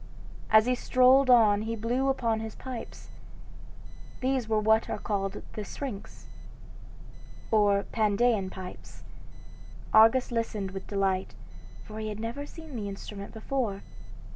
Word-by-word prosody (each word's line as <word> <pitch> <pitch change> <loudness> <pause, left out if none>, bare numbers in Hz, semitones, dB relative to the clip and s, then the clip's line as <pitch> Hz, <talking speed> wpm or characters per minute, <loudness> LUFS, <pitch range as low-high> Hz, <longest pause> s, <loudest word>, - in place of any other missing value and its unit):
As 220 0 +6
he 250 - +2
strolled 255 +2 +4
on 215 -4 +6
he 225 +1 -3
blew 245 +5 0
upon 230 -4 0
his 220 -1 -6
pipes. 255 -3 -8 1.1
These 255 -3 -1
were 220 -1 +2
what 220 +1 +3
are - - -2
called 200 -2 -3
the 215 - -4
Syrinx 215 -1 -7 1.3
or 205 -2 +3
Pandean 215 -2 +1
pipes. 185 -1 -10 0.9
Argus 225 +4 +6
listened 215 -4 -2
with 195 0 -7
delight, 195 -2 -1 0.5
for 215 -1 -8
he 215 0 -3
had 210 0 -6
never 235 +6 -5
seen 320 -4 -11
the 205 -3 -4
instrument 200 0 -8
before. 220 -3 -3
220 Hz, 130 wpm, -28 LUFS, 205-245 Hz, 1.3 s, As